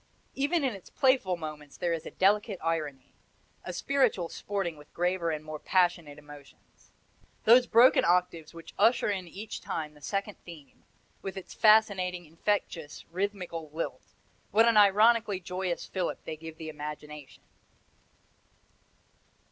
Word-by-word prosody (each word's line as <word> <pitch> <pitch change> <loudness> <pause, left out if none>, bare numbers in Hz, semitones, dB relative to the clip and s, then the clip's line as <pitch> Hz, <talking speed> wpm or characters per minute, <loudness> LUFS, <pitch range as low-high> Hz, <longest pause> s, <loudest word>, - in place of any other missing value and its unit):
Even 290 +4 0
in 260 -4 0
its 195 -3 -12
playful 260 -10 +2
moments 155 -3 -8
there 175 -2 0
is 165 - -4
delicate 205 +1 +2
irony, 155 -5 -3 0.5
a - - -5
spiritual 250 -11 +1
sporting 195 -5 -3
with 150 0 -17
graver 175 -1 0
and 155 -1 -4
more 155 -1 -6
passionate 175 -5 +1
emotions. 145 -1 -16 0.5
Those 245 +3 +6
broken 240 +3 +6
octaves 170 -2 +1
which 165 -1 -12
usher 235 -2 +4
in 190 -3 -4
each 200 +5 -7
time 150 -1 -4
the 150 - -19
second 200 +6 -3
theme, 160 -5 -14 0.4
with 195 0 -6
its 190 - -8
fascinating, 190 -5 +3
infectious, 165 -2 -3
rhythmical 180 -4 -4
lilt, 160 +2 -4 0.5
what 225 +2 +4
an 230 - +4
ironically 210 0 +5
joyous 180 -1 -3
fillip 185 -2 -3
they 155 - -5
give 160 0 -10
the 160 -1 -7
imagination! 150 -2 -8
180 Hz, 135 wpm, -29 LUFS, 155-205 Hz, 0.5 s, Those